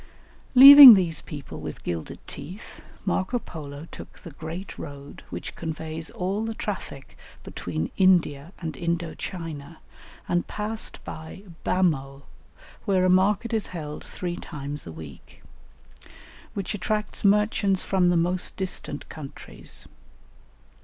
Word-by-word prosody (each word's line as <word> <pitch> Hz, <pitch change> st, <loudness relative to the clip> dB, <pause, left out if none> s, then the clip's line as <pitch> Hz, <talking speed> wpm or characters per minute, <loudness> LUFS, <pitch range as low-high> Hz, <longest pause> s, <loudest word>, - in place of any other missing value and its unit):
] -, -, -29 dB
Leaving 275 Hz, -1 st, +13 dB
these 170 Hz, -5 st, 0 dB
people 145 Hz, -3 st, -9 dB
with -, -, -8 dB
gilded 85 Hz, -2 st, -4 dB
teeth, 170 Hz, +10 st, -10 dB, 0.2 s
Marco 195 Hz, +6 st, 0 dB
Polo 150 Hz, -7 st, -9 dB
took -, -, -11 dB
the 170 Hz, -, -9 dB
great 160 Hz, +6 st, -8 dB
road 140 Hz, -2 st, -9 dB
which -, -, -7 dB
conveys 160 Hz, 0 st, -5 dB
all 195 Hz, +4 st, -2 dB
the 225 Hz, 0 st, -4 dB
traffic 185 Hz, -11 st, -6 dB, 0.3 s
between 80 Hz, -2 st, -4 dB
India 170 Hz, -5 st, +3 dB
and 160 Hz, -3 st, -5 dB
Indo 170 Hz, -1 st, -2 dB
China, 165 Hz, -3 st, -7 dB, 0.5 s
and 175 Hz, 0 st, 0 dB
passed 215 Hz, +1 st, -4 dB
by 160 Hz, +5 st, -9 dB, 0.2 s
Bhamo, 140 Hz, -7 st, 0 dB, 0.6 s
where 190 Hz, -3 st, +2 dB
a 185 Hz, -, +4 dB
market 200 Hz, +5 st, +2 dB
is 220 Hz, -2 st, 0 dB
held 150 Hz, -2 st, -7 dB
three 175 Hz, -1 st, -5 dB
times 145 Hz, -, -7 dB
a -, -, -6 dB
week, 80 Hz, -3 st, -12 dB, 1.1 s
which 200 Hz, +1 st, -3 dB
attracts 210 Hz, +1 st, -3 dB
merchants 205 Hz, -1 st, +2 dB
from 185 Hz, -2 st, +2 dB
the 175 Hz, -, +3 dB
most 175 Hz, +2 st, 0 dB
distant 190 Hz, -1 st, -3 dB
countries. 145 Hz, -3 st, -8 dB
175 Hz, 125 wpm, -25 LUFS, 150-195 Hz, 1.1 s, Leaving